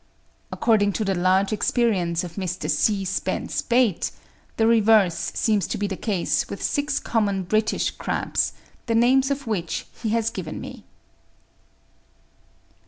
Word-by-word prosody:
According 205 Hz, -3 st, +2 dB
to 215 Hz, -, -2 dB
the 195 Hz, -, +1 dB
large 190 Hz, +3 st, +2 dB
experience 190 Hz, -7 st, +1 dB
of 175 Hz, -2 st, -7 dB
Mr. 185 Hz, -1 st, -4 dB
C. 200 Hz, -3 st, +1 dB
Spence 190 Hz, 0 st, -2 dB
Bate, 235 Hz, -6 st, +1 dB, 0.5 s
the 225 Hz, -, +3 dB
reverse 220 Hz, -6 st, +3 dB
seems 210 Hz, -5 st, +1 dB
to -, -, -3 dB
be 205 Hz, -, -1 dB
the 200 Hz, -1 st, -3 dB
case 195 Hz, -3 st, -1 dB
with -, -, -6 dB
six 290 Hz, 0 st, 0 dB
common 200 Hz, -4 st, 0 dB
British 215 Hz, +4 st, 0 dB
crabs, -, -, -1 dB, 0.3 s
the 230 Hz, -, +1 dB
names 260 Hz, +3 st, +4 dB
of 280 Hz, 0 st, -2 dB
which 190 Hz, -7 st, -3 dB, 0.2 s
he 225 Hz, -, -1 dB
has 230 Hz, +1 st, +1 dB
given 170 Hz, -5 st, -6 dB
me. -, -, -9 dB
210 Hz, 140 wpm, -23 LUFS, 185-230 Hz, 0.5 s, names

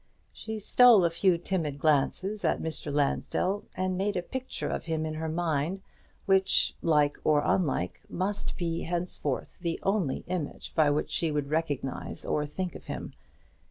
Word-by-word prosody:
She 220 Hz, 0 st, -5 dB
stole 220 Hz, -2 st, +6 dB
a 170 Hz, -, +2 dB
few 175 Hz, +1 st, +3 dB
timid 165 Hz, -5 st, -2 dB
glances 160 Hz, +8 st, +1 dB
at 160 Hz, -, +2 dB
Mr. 160 Hz, -2 st, -3 dB
Lansdell, 165 Hz, +7 st, 0 dB
and 185 Hz, 0 st, -1 dB
made 200 Hz, 0 st, 0 dB
a 175 Hz, -, -1 dB
picture 260 Hz, +7 st, -4 dB
of -, -, -3 dB
him 160 Hz, -1 st, -1 dB
in 155 Hz, -, -3 dB
her 160 Hz, +1 st, -3 dB
mind, 165 Hz, +2 st, -1 dB, 0.4 s
which, 190 Hz, 0 st, +4 dB
like 150 Hz, -3 st, +3 dB
or 150 Hz, -1 st, +3 dB
unlike, 135 Hz, -, 0 dB
must 195 Hz, +3 st, -2 dB
be 165 Hz, -2 st, -2 dB
henceforth 170 Hz, -5 st, -3 dB
the 170 Hz, -2 st, -2 dB
only 195 Hz, -8 st, 0 dB
image 175 Hz, -5 st, -4 dB
by 155 Hz, -3 st, +4 dB
which 145 Hz, +1 st, 0 dB
she 165 Hz, -, 0 dB
would 145 Hz, -1 st, -2 dB
recognize 145 Hz, -5 st, -2 dB
or 150 Hz, -1 st, 0 dB
think 180 Hz, +4 st, -4 dB
of -, -, -11 dB
him. -, -, -5 dB
165 Hz, 160 wpm, -29 LUFS, 150-190 Hz, 0.4 s, stole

